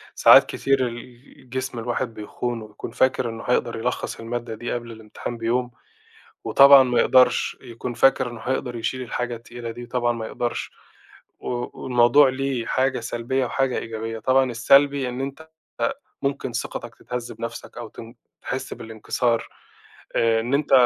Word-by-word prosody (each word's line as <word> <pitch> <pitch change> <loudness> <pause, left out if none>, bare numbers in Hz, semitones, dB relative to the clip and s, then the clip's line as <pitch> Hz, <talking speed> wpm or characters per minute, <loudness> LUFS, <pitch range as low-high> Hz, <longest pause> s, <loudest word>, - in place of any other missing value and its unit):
ساعات - - +8
كتير 135 -2 +1
الجسم 125 +1 -7
الواحد 120 +1 -2
بيخونه، 115 +2 -4
ويكون 105 +2 -9
فاكر 130 0 +1
إنّه 115 0 -7
هيقدر 125 -1 0
يلخّص 120 +3 -3
المادة 115 0 -4
دي 120 +2 -5
قبل 120 -1 -5
الإمتحان 110 +1 -7
بيوم، 120 +2 -1 0.7
وطبعًا 140 0 +8
ما 125 -2 +2
يقدرش، 130 -1 +4
يكون 120 0 -6
فاكر 130 0 +3
إنّه 120 -1 -9
هيقدر 125 +1 -2
يشيل 130 +3 -3
الحاجة 120 -1 -3
التقيلة 120 0 -8
دي 120 +2 -8
وطبعًا 120 0 0
ما 115 -1 -5
يقدرش، 120 +1 -3 0.7
و 120 0 -4
والموضوع 125 +3 +5
ليه 130 -2 -2
حاجة 130 0 +1
سلبية 120 +3 -1
وحاجة 135 0 0
إيجابية، 115 0 -5
طبعًا 130 +3 +2
السلبي 135 +3 +4
إن 125 - -6
أنت 140 +4 -6 0.3
آآ، 275 - +1 0.3
ممكن 140 -2 -2
ثقتك 120 0 -5
تتهزّ 125 +1 -6
بنَفْسك 115 +1 -7
أو 120 -2 -6
تن 115 +2 -11 0.3
تحسّ 130 0 -4
بالإنكسار 115 +1 -2 0.7
آآ، 115 -1 +3
إن 120 +4 -2
أنت 145 0 0
120 Hz, 150 wpm, -23 LUFS, 115-130 Hz, 0.7 s, ساعات